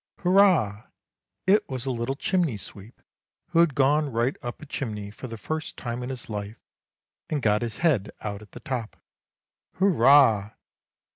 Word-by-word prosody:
' -, -, -68 dB
Hurrah! 175 Hz, -, +3 dB, 0.3 s
' -, -, -60 dB
It 205 Hz, +3 st, +3 dB
was 130 Hz, -2 st, -4 dB
a 135 Hz, -, -1 dB
little 120 Hz, +2 st, -2 dB
chimney 165 Hz, -, 0 dB
sweep 100 Hz, +3 st, -12 dB, 0.5 s
who 170 Hz, -1 st, +2 dB
had 170 Hz, -5 st, +4 dB
gone 145 Hz, +1 st, +2 dB
right 120 Hz, +4 st, 0 dB
up 120 Hz, 0 st, -6 dB
a -, -, -10 dB
chimney 105 Hz, -8 st, -5 dB
for 120 Hz, +5 st, -9 dB
the 115 Hz, -1 st, -7 dB
first 155 Hz, +7 st, -5 dB
time 120 Hz, -1 st, -4 dB
in 125 Hz, -, -5 dB
his 130 Hz, -2 st, -6 dB
life, 105 Hz, 0 st, -6 dB, 0.7 s
and 150 Hz, -, 0 dB
got 105 Hz, -4 st, +2 dB
his 115 Hz, -2 st, -4 dB
head 115 Hz, -, +2 dB
out 100 Hz, -1 st, -5 dB
at 105 Hz, -, -16 dB
the -, -, -10 dB
top. 120 Hz, -5 st, -4 dB, 0.4 s
' -, -, -64 dB
Hurrah! 135 Hz, -, +5 dB
125 Hz, 180 wpm, -26 LUFS, 110-150 Hz, 0.7 s, Hurrah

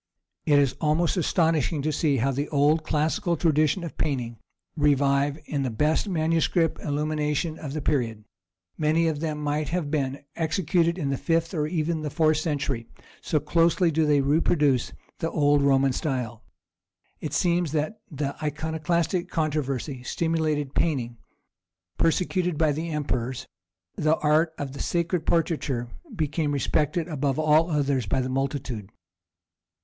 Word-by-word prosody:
It 145 Hz, -2 st, +5 dB
is 140 Hz, -3 st, +3 dB
most 160 Hz, +3 st, +2 dB
astonishing 165 Hz, -4 st, +1 dB
to 155 Hz, -, 0 dB
see 145 Hz, -1 st, +1 dB
how 135 Hz, +3 st, +1 dB
the 140 Hz, +3 st, -2 dB
old 150 Hz, +2 st, +3 dB
classical 155 Hz, +3 st, 0 dB
tradition 155 Hz, +2 st, +2 dB
of 170 Hz, -, -8 dB
painting 120 Hz, -6 st, -2 dB, 0.4 s
revive 140 Hz, -1 st, +2 dB
in 145 Hz, -2 st, -2 dB
the 130 Hz, -, -1 dB
best 150 Hz, -, +1 dB
manuscript 165 Hz, 0 st, +1 dB
illumination 150 Hz, +1 st, -1 dB
of 145 Hz, -3 st, -6 dB
the 155 Hz, -2 st, -4 dB
period; 115 Hz, -8 st, -1 dB, 0.6 s
many 160 Hz, +2 st, +2 dB
of 155 Hz, -2 st, -1 dB
them 155 Hz, -1 st, -2 dB
might 150 Hz, 0 st, -1 dB
have 165 Hz, -4 st, -2 dB
been 140 Hz, -3 st, -1 dB
executed 170 Hz, +1 st, +1 dB
in 145 Hz, -6 st, -1 dB
the 135 Hz, -, -2 dB
fifth 165 Hz, 0 st, 0 dB
or 150 Hz, -3 st, 0 dB
even 160 Hz, -1 st, -1 dB
the 150 Hz, -, -3 dB
fourth 155 Hz, 0 st, +2 dB
century, 140 Hz, -7 st, -2 dB, 0.3 s
so 155 Hz, -, 0 dB
closely 165 Hz, +3 st, +2 dB
do 155 Hz, 0 st, +2 dB
they 145 Hz, -1 st, +4 dB
reproduce 145 Hz, -2 st, +2 dB, 0.3 s
the 165 Hz, -, -1 dB
old 145 Hz, -2 st, +3 dB
Roman 135 Hz, -1 st, +3 dB
style. 125 Hz, -6 st, -3 dB, 0.8 s
It 155 Hz, -, -5 dB
seems 170 Hz, +1 st, +1 dB
that 155 Hz, +7 st, -2 dB
the 145 Hz, -3 st, -3 dB
Iconoclastic 160 Hz, +4 st, -1 dB
controversy 145 Hz, -5 st, -2 dB
stimulated 155 Hz, 0 st, -1 dB
painting; 120 Hz, -8 st, -1 dB, 0.8 s
persecuted 180 Hz, 0 st, +1 dB
by 155 Hz, -1 st, +3 dB
the 160 Hz, +4 st, -3 dB
emperors, 130 Hz, -5 st, -2 dB, 0.5 s
the 155 Hz, +1 st, +2 dB
art 155 Hz, +2 st, +2 dB
of 140 Hz, -1 st, -5 dB
sacred 170 Hz, 0 st, -1 dB
portraiture 150 Hz, -7 st, 0 dB, 0.3 s
became 155 Hz, -2 st, -1 dB
respected 150 Hz, +5 st, 0 dB
above 145 Hz, -4 st, -1 dB
all 155 Hz, +2 st, +4 dB
others 140 Hz, -6 st, 0 dB
by 115 Hz, -, +1 dB
the 130 Hz, 0 st, -1 dB
multitude. 130 Hz, -6 st, -3 dB
150 Hz, 145 wpm, -26 LUFS, 140-165 Hz, 0.8 s, It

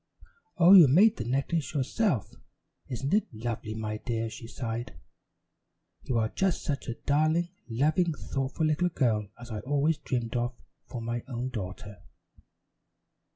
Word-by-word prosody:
"Oh, 175 Hz, +2 st, +7 dB
you 175 Hz, -6 st, +10 dB
made 195 Hz, -, +5 dB
the 115 Hz, -, -3 dB
necklace 140 Hz, +5 st, -1 dB
yourself? 145 Hz, -, 0 dB, 0.5 s
Isn't 135 Hz, +5 st, -3 dB
it 210 Hz, -, +3 dB
lovely, 110 Hz, -1 st, -4 dB
my 110 Hz, -1 st, -3 dB
dear?" 115 Hz, 0 st, -3 dB
she 115 Hz, -, -9 dB
sighed. 115 Hz, -6 st, -5 dB, 1.1 s
"You 125 Hz, -, -1 dB
are 110 Hz, -1 st, +1 dB
just 190 Hz, -3 st, 0 dB
such 140 Hz, -2 st, -3 dB
a 120 Hz, -, -3 dB
darling, 155 Hz, +6 st, +1 dB, 0.2 s
loving, 155 Hz, +8 st, +2 dB
thoughtful 135 Hz, +2 st, -2 dB
little 155 Hz, +4 st, +2 dB
girl 115 Hz, -10 st, +1 dB
as 120 Hz, 0 st, -10 dB
I 110 Hz, -, -3 dB
always 145 Hz, +6 st, +1 dB
dreamed 120 Hz, -2 st, -3 dB
of 120 Hz, +1 st, -1 dB, 0.3 s
for 120 Hz, -2 st, -6 dB
my 120 Hz, +1 st, -2 dB
own 125 Hz, -1 st, -3 dB
daughter." 100 Hz, -3 st, -7 dB
130 Hz, 145 wpm, -29 LUFS, 115-155 Hz, 1.1 s, you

